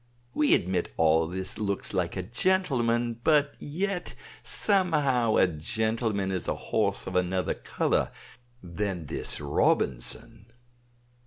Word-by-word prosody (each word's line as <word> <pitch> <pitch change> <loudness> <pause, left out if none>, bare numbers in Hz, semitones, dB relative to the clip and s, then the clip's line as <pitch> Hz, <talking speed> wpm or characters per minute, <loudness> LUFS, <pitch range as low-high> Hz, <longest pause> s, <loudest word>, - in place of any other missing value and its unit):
We 150 - +4
admit 90 0 -1
all 80 0 +3
this 95 +4 -3
looks 100 -1 -2
like 90 -1 -1
a 95 - -2
gentleman. 120 - +1
But 150 -2 +3
yet, 180 +4 -3 0.3
somehow, 150 - +2
a - - +5
gentleman 110 +4 -1
is 90 -3 -2
a - - 0
horse 100 -3 -1
of 95 - -6
another 90 0 +1
color - - -1 0.5
than 90 -1 -3
this - - -1
Robinson." 70 - 0
105 Hz, 115 wpm, -27 LUFS, 90-130 Hz, 0.5 s, a